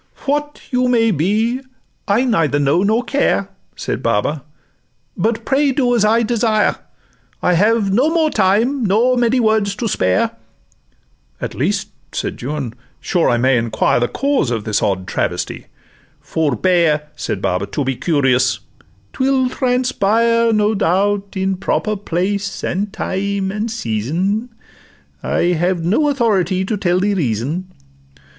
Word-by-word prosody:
'What 295 +1 -2
you 250 0 +2
may 230 -2 +3
be, 215 - 0 0.5
I 205 +5 +3
neither 165 - +1
know 145 +4 +2
nor 220 +5 +2
care,' 245 -7 0 0.3
Said - - -4
Baba; 140 +9 0 0.7
'but 225 +4 -1
pray 280 +1 +2
do 250 -2 +1
as 235 -3 +2
I 225 +2 +3
desire: 220 -2 +1 0.7
I 180 - +3
have 205 +2 +2
no 260 +9 +3
more 320 -2 +1
time 220 +7 +2
nor 225 +5 +3
many 245 +1 +2
words 215 -3 +1
to 230 - -2
spare.' 95 - +1 1.1
'At - - -4
least,' - - -1 0.2
said - - -4
Juan, 135 -2 -4 0.3
'sure 175 -3 +1
I 120 - +2
may 125 +1 +3
enquire 115 +1 +1
The 120 - +1
cause 275 - 0
of 115 -3 -2
this 105 0 0
odd 95 -3 0
travesty?'—'Forbear,' 155 - -2
Said - - -3
Baba, 90 +2 -1
'to 145 - -2
be 135 0 -1
curious; 130 -3 +2 0.6
'twill 260 -1 +1
transpire, 230 -3 +1
No 215 0 +2
doubt, 200 +1 0
in 190 0 0
proper 215 +3 -1
place, 195 +1 -2
and 200 +3 -2
time, 195 0 -2
and 215 +3 -3
season: 185 - -2 0.7
I 175 +1 +1
have 175 +1 0
no 265 - +2
authority 195 - +1
to 215 - -1
tell 180 -2 +1
the 205 +2 +1
reason. 155 - -2
200 Hz, 135 wpm, -18 LUFS, 160-230 Hz, 1.1 s, may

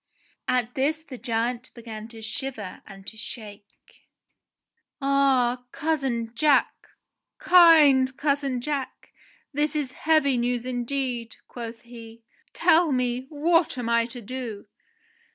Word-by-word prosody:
At 245 -1 0
this 310 +4 0
the 260 -6 -10
giant 240 +1 -2
began 225 -2 -8
to 225 -1 -11
shiver 220 -4 -6
and 195 -1 -12
to 220 - -10
shake. 210 -2 -12 0.9
"Ah! 270 -3 +2
Cousin 270 -7 -2
Jack! 295 +3 +3 0.6
Kind 300 -7 +6
cousin 280 -3 0
Jack! 280 -1 -4 0.4
This 295 +1 0
is 290 -4 -1
heavy 305 -2 +2
news 245 0 -1
in 245 -1 -3
deed," 250 -3 -3
quoth 230 -1 -8
he. 230 -1 -12 0.3
"Tell 330 -1 +3
me, 250 0 -1
what 325 0 +1
am 240 -2 -3
I 235 0 +2
to 245 0 -8
do 230 -2 -6
250 Hz, 120 wpm, -25 LUFS, 230-280 Hz, 0.9 s, Kind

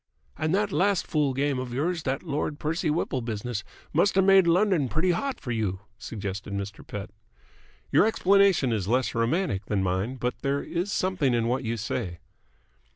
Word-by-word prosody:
"And 155 0 -1
that 205 0 +1
last 195 0 +2
fool 145 -4 0
game 140 -1 0
of 125 -1 -5
yours, 165 +5 0
that 135 - -2
Lord 150 +1 -2
Percy 160 +2 -1
Whipple 150 -4 -1
business, 115 0 -4 0.3
must 175 +6 +3
have 190 - +5
made 190 -2 +6
London 175 - +3
pretty 170 +6 +2
hot 265 +10 -2
for 130 -4 -5
you?" 105 -5 -1 0.2
suggested 100 -3 -5
Mr. 100 +1 -5
Pett. 100 -2 -6 0.8
"Your - - +5
explanation 195 - +4
is 100 -4 -2
less 125 +3 +1
romantic 115 - 0
than 100 -3 0
mine, 95 +7 -1
but 125 -1 -3
there 140 +1 0
is 180 +4 -2
something 180 -11 +1
in 115 -1 +1
what 125 +3 0
you 115 0 -2
say." 105 -4 -3
135 Hz, 175 wpm, -27 LUFS, 115-175 Hz, 0.8 s, made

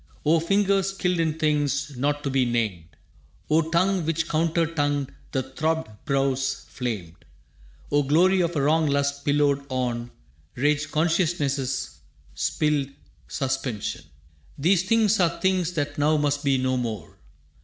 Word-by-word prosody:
O 160 +2 +4
fingers 195 +2 +1
skilled 180 -2 0
in 160 -1 0
things 145 -2 0
not 145 +3 -1
to 140 - -1
be 135 -1 +2
named! 110 -9 -1 0.7
O 160 +1 +3
tongue 185 +2 +2
which, 160 +1 -1
counter 165 +1 +1
tongued, 145 -4 -1 0.2
the 130 - -1
throbbed 160 0 -2
brows 135 -1 0
flamed! 105 -10 -5 0.7
O 145 0 +4
glory 175 +7 +3
of 170 0 -1
a 145 - +1
wrong 155 +2 +3
lust 140 0 0
pillowed 145 -1 +2
on 120 -2 -2 0.5
Raged 145 +3 0
conciousness's 155 -5 0 0.3
spilled 150 -3 0 0.4
suspension! 130 -5 -3 0.5
These 175 +5 +2
things 220 -2 +3
are 170 -2 +1
things 185 -2 +1
that 145 -2 -3
now 155 +2 +3
must 145 0 0
be 140 -2 +2
no 130 0 0
more. 110 -8 -5
145 Hz, 135 wpm, -25 LUFS, 135-165 Hz, 0.7 s, O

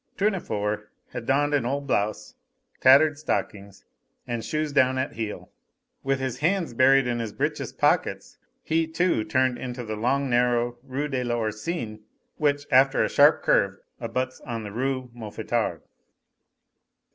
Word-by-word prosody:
Tournefort 105 - -1 0.2
had 120 -2 -6
donned 145 +2 +2
an 145 - +2
old 140 +4 -2
blouse, 105 -5 -1 0.5
tattered 145 +3 +6
stockings, 100 -9 -4 0.4
and 120 -1 -3
shoes 155 -1 -2
down 130 -2 +3
at 130 +2 -2
heel. 110 -2 -6 0.5
With 135 0 0
his 130 -2 -3
hands 170 -1 0
buried 135 +2 +5
in 120 -1 -1
his 115 -2 -3
breeches' - - -2
pockets, - - 0 0.2
he, 160 0 +1
too, 165 -7 +1
turned 130 +3 +1
into 125 -1 -5
the 110 -1 -4
long 135 +6 0
narrow 120 -1 +1
Rue 135 +3 -3
de 130 -3 -2
l'Oursine, 115 +1 -3 0.4
which, 145 -2 +1
after 135 +1 +5
a - - 0
sharp 145 +2 +5
curve, 95 -1 +2 0.2
abuts 125 +2 -3
on 115 -2 -5
the 105 - -7
Rue 130 +2 -2
Mouffetard. 110 -3 -3
130 Hz, 145 wpm, -25 LUFS, 115-140 Hz, 0.5 s, tattered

